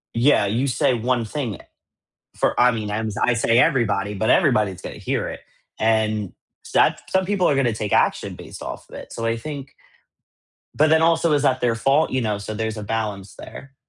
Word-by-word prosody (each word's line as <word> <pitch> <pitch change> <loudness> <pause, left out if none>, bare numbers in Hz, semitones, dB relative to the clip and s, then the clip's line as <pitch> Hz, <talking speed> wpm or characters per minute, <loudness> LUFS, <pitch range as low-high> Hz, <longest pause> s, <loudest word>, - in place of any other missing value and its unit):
yeah, 120 -2 +4
you 115 +7 0
say 130 0 +1
one 120 0 0
thing 115 - -4 0.8
for, - - 0
I 125 0 +6
mean, 110 -2 -4
I'm 110 +1 -2
I 125 - +3
say 115 0 +2
everybody, 115 -8 +2
but 110 +2 -1
everybody's 100 -4 +2
gonna - - -7
hear - - -2
it, - - -8 0.4
and 110 -3 0 0.4
that's - - +3
some 190 0 +2
people 195 -1 +1
are - - +3
going 135 - +2
to 120 - +1
take 105 -1 -3
action - - +1
based - - -11
off - - -7
of - - -11
it, - - -10
so 115 - -4
I 115 0 0
think 140 +2 -7 1.0
But 155 +1 +4
then 160 0 +4
also 165 0 +3
is 145 -1 +2
that 130 -2 +2
their 120 -2 +2
fault, 135 +7 +2
you 130 - 0
know, 105 -3 -1
so 105 +1 -6
there's 110 0 -3
a 105 - -5
balance 105 -3 -4
there. 135 0 -11
115 Hz, 205 wpm, -22 LUFS, 110-135 Hz, 1.0 s, I